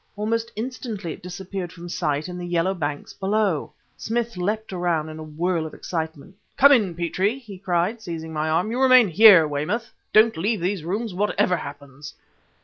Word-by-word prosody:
Almost 225 Hz, +2 st, -2 dB
instantly 220 Hz, -6 st, -5 dB
it -, -, -13 dB
disappeared 180 Hz, 0 st, -6 dB
from 175 Hz, 0 st, -10 dB
sight 150 Hz, -3 st, -2 dB
in 180 Hz, 0 st, -7 dB
the 175 Hz, -, -5 dB
yellow 175 Hz, +2 st, +1 dB
banks 145 Hz, -5 st, -4 dB
below. 195 Hz, -5 st, 0 dB, 0.2 s
Smith 235 Hz, 0 st, -2 dB
leapt 210 Hz, +3 st, -2 dB
around 170 Hz, -3 st, -1 dB
in 155 Hz, 0 st, -8 dB
a -, -, -6 dB
whirl 160 Hz, +2 st, -2 dB
of -, -, -11 dB
excitement. 160 Hz, +1 st, -5 dB, 0.2 s
"Come 280 Hz, +1 st, +7 dB
in, 205 Hz, -10 st, +3 dB
Petrie!" 185 Hz, +7 st, 0 dB
he 215 Hz, -8 st, -11 dB
cried, 185 Hz, +4 st, -1 dB
seizing 160 Hz, -4 st, -6 dB
my 155 Hz, 0 st, -1 dB
arm. 175 Hz, +7 st, +1 dB
"You 250 Hz, +3 st, -1 dB
remain 255 Hz, -5 st, +6 dB
here, 185 Hz, -3 st, +8 dB
Weymouth; 155 Hz, +12 st, -3 dB, 0.2 s
don't 220 Hz, +1 st, +5 dB
leave 205 Hz, +6 st, 0 dB
these 180 Hz, 0 st, -2 dB
rooms 205 Hz, +5 st, -3 dB
whatever 185 Hz, -1 st, +1 dB
happens!" 145 Hz, -2 st, -9 dB
180 Hz, 175 wpm, -23 LUFS, 160-215 Hz, 0.2 s, here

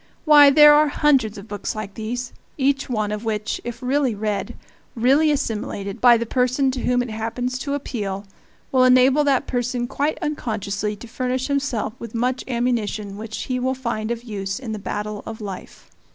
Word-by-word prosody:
Why, 295 Hz, -2 st, +8 dB
there 295 Hz, +1 st, +8 dB
are 300 Hz, +1 st, +5 dB
hundreds 270 Hz, -8 st, +2 dB
of 200 Hz, +2 st, -10 dB
books 205 Hz, 0 st, -4 dB
like 215 Hz, -2 st, -6 dB
these, 240 Hz, +3 st, -5 dB, 0.2 s
each 275 Hz, -1 st, +1 dB
one 215 Hz, -4 st, -1 dB
of 210 Hz, +1 st, -4 dB
which, 215 Hz, -2 st, -2 dB
if 240 Hz, +2 st, -7 dB
really 260 Hz, -2 st, +1 dB
read, 205 Hz, -2 st, -3 dB, 0.4 s
really 270 Hz, +7 st, +4 dB
assimilated, 210 Hz, -7 st, -3 dB
by 240 Hz, -1 st, +7 dB
the 235 Hz, -, -2 dB
person 255 Hz, +3 st, +1 dB
to 255 Hz, -, -4 dB
whom 245 Hz, +1 st, +1 dB
it 245 Hz, -, -7 dB
happens 235 Hz, +3 st, -3 dB
to 280 Hz, 0 st, -2 dB
appeal, 205 Hz, -8 st, -4 dB, 0.5 s
will 255 Hz, -1 st, +4 dB
enable 255 Hz, +3 st, +5 dB
that 275 Hz, -3 st, +2 dB
person 245 Hz, 0 st, -2 dB
quite 285 Hz, +4 st, -1 dB
unconsciously 215 Hz, -7 st, -3 dB
to 230 Hz, +3 st, -11 dB
furnish 255 Hz, +3 st, -2 dB
himself 275 Hz, -6 st, -1 dB
with 230 Hz, -1 st, -8 dB
much 250 Hz, +2 st, 0 dB
ammunition 235 Hz, -5 st, -1 dB
which 220 Hz, +1 st, -6 dB
he 255 Hz, -1 st, -2 dB
will 260 Hz, +1 st, 0 dB
find 235 Hz, -4 st, -3 dB
of 235 Hz, 0 st, -3 dB
use 195 Hz, -4 st, -4 dB
in 255 Hz, -4 st, -6 dB
the 215 Hz, -, -4 dB
battle 210 Hz, +2 st, -4 dB
of 225 Hz, -1 st, -6 dB
life. 200 Hz, -4 st, -9 dB
240 Hz, 180 wpm, -22 LUFS, 215-260 Hz, 0.5 s, Why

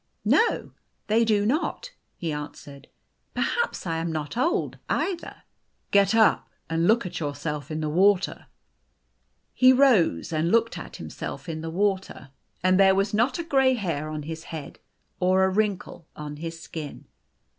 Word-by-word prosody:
"No, 460 Hz, -, +2 dB, 0.3 s
they 225 Hz, +2 st, +3 dB
do 210 Hz, -2 st, +2 dB
not," 310 Hz, -, -1 dB, 0.3 s
he 165 Hz, -2 st, -3 dB
answered. 145 Hz, -1 st, -8 dB, 0.5 s
"Perhaps 475 Hz, -, -1 dB
I 165 Hz, -2 st, -1 dB
am. 165 Hz, 0 st, -2 dB
not 155 Hz, +1 st, -4 dB
old 290 Hz, +9 st, 0 dB
either." 365 Hz, -3 st, -2 dB, 0.2 s
" -, -, -46 dB
Get 200 Hz, +1 st, +4 dB
up 220 Hz, -2 st, +4 dB, 0.2 s
and 165 Hz, +1 st, +1 dB
look 225 Hz, 0 st, +3 dB
at 180 Hz, -, -5 dB
yourself 145 Hz, -1 st, -4 dB
in 155 Hz, 0 st, -3 dB
the 155 Hz, -, -1 dB
water." 190 Hz, +5 st, +2 dB, 1.1 s
He 255 Hz, 0 st, +6 dB
rose 240 Hz, -, +3 dB
and 160 Hz, +2 st, +1 dB
looked 230 Hz, 0 st, +2 dB
at -, -, -8 dB
himself -, -, -7 dB
in 160 Hz, -1 st, -4 dB
the 165 Hz, -, -5 dB
water, 190 Hz, -6 st, -2 dB, 0.3 s
and 185 Hz, +1 st, +4 dB
there 190 Hz, -1 st, +6 dB
was 195 Hz, +1 st, 0 dB
not 235 Hz, +5 st, +2 dB
a 340 Hz, -, -3 dB
gray 270 Hz, -5 st, +3 dB
hair 165 Hz, -9 st, -3 dB
on 155 Hz, -1 st, -5 dB
his 160 Hz, +2 st, -7 dB
head 155 Hz, -4 st, -8 dB, 0.4 s
or 185 Hz, +1 st, +3 dB
a 190 Hz, -, +3 dB
wrinkle 195 Hz, -4 st, -2 dB
on 150 Hz, -1 st, -7 dB
his 165 Hz, +1 st, -6 dB
skin. 155 Hz, -2 st, -8 dB
185 Hz, 160 wpm, -25 LUFS, 160-220 Hz, 1.1 s, He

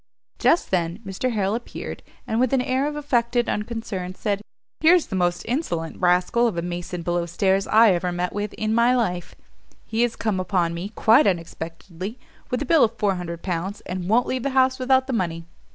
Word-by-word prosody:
Just 335 Hz, -, +3 dB
then 170 Hz, -2 st, 0 dB
Mr 195 Hz, +6 st, -2 dB
Harrel 200 Hz, -2 st, 0 dB
appeared, 240 Hz, +1 st, -6 dB, 0.2 s
and, 220 Hz, -, -1 dB
with 255 Hz, +1 st, +2 dB
an 265 Hz, -, +3 dB
air 260 Hz, +3 st, 0 dB
of 295 Hz, -, -4 dB
affected 240 Hz, -5 st, +1 dB
unconcern, 210 Hz, -4 st, -3 dB
said, 205 Hz, 0 st, -1 dB, 0.4 s
"Here's 335 Hz, +1 st, +5 dB
the -, -, -5 dB
most 175 Hz, -1 st, 0 dB
insolent 175 Hz, -, -2 dB
rascal 180 Hz, +7 st, +3 dB
of 205 Hz, -7 st, -3 dB
a 170 Hz, -, -1 dB
mason 175 Hz, 0 st, -5 dB
below 175 Hz, 0 st, -1 dB
stairs 190 Hz, +2 st, +1 dB
I 220 Hz, 0 st, +6 dB
ever 180 Hz, 0 st, -1 dB
met 175 Hz, +1 st, -2 dB
with 205 Hz, 0 st, -3 dB
in 215 Hz, 0 st, -1 dB
my 235 Hz, +2 st, +4 dB
life; 180 Hz, -8 st, -2 dB, 0.5 s
he 225 Hz, +1 st, -1 dB
has 240 Hz, -1 st, +1 dB
come 215 Hz, -4 st, -1 dB
upon 180 Hz, -3 st, 0 dB
me, 175 Hz, +4 st, -5 dB
quite 225 Hz, +5 st, +4 dB
unexpectedly, 175 Hz, +3 st, -4 dB, 0.3 s
with 250 Hz, +3 st, -1 dB
a -, -, -6 dB
bill 315 Hz, +2 st, +5 dB
of 230 Hz, 0 st, +1 dB
400 180 Hz, -5 st, -2 dB
pounds, 185 Hz, +2 st, -3 dB
and 180 Hz, 0 st, -5 dB
won't 240 Hz, +3 st, +4 dB
leave 255 Hz, 0 st, -2 dB
the 275 Hz, -, -1 dB
house 260 Hz, 0 st, +4 dB
without 260 Hz, 0 st, +3 dB
the 265 Hz, -, -3 dB
money. 170 Hz, -6 st, -2 dB
205 Hz, 195 wpm, -23 LUFS, 180-240 Hz, 0.5 s, I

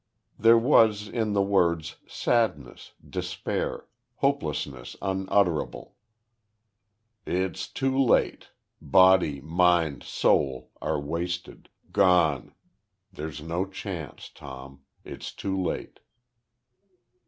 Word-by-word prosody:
There 115 Hz, +2 st, +7 dB
was 110 Hz, -4 st, +4 dB
in 110 Hz, -1 st, -1 dB
the 100 Hz, -1 st, +3 dB
words 85 Hz, -5 st, +1 dB
sadness, 105 Hz, -, -1 dB
despair, -, -, -3 dB, 0.3 s
hopelessness 75 Hz, -, -2 dB
unutterable. 95 Hz, -3 st, -1 dB, 1.3 s
"It's 95 Hz, 0 st, -2 dB
too 135 Hz, 0 st, -1 dB
late. 130 Hz, -, +2 dB, 0.3 s
Body, 95 Hz, -7 st, +4 dB
mind, 85 Hz, -1 st, +2 dB
soul 65 Hz, -3 st, 0 dB
are -, -, -1 dB
wasted, 85 Hz, +5 st, -5 dB, 0.2 s
gone. 85 Hz, -8 st, +3 dB, 0.6 s
There's 75 Hz, -1 st, -6 dB
no 85 Hz, +4 st, -2 dB
chance, 95 Hz, -5 st, -7 dB
Tom. 70 Hz, 0 st, -11 dB, 0.2 s
It's -, -, -7 dB
too 95 Hz, -1 st, -4 dB
late!" 95 Hz, -2 st, -3 dB
90 Hz, 85 wpm, -26 LUFS, 75-100 Hz, 1.3 s, There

